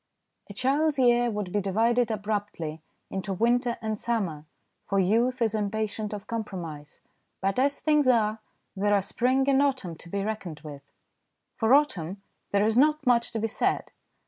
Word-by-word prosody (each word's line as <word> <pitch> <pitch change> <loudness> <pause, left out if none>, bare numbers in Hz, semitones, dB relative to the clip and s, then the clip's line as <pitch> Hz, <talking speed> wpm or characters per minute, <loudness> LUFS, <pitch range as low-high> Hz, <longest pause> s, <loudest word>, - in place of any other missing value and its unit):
A - - -7
child's 285 +6 +1
year 240 -2 +4
would 210 -4 -4
be 205 - 0
divided 230 +5 +2
abruptly 205 -7 -3 0.3
into 190 0 -3
winter 240 +4 +1
and 215 -1 -2
summer, 185 -11 -2 0.4
for 195 - 0
youth 235 +6 +2
is 220 -2 +1
impatient 215 0 -2
of 210 -1 -6
compromise, 175 -10 -6 0.4
but 195 +4 0
as 280 +2 +2
things 300 -3 +2
are, 220 -3 +3 0.4
there 205 +1 +2
are 200 - +3
spring 260 +6 +1
and 275 0 +4
autumn 260 -12 0
to 170 - -12
be 200 +2 -2
reckoned 195 -8 -5
with. 145 -2 -11 0.6
For 230 +3 +4
autumn, 195 - 0 0.3
there 200 +1 +2
is 220 +2 +3
not 300 +1 +3
much 240 -1 +3
to 225 - -1
be 220 - -1
said. 225 - -1
215 Hz, 165 wpm, -27 LUFS, 195-245 Hz, 0.6 s, year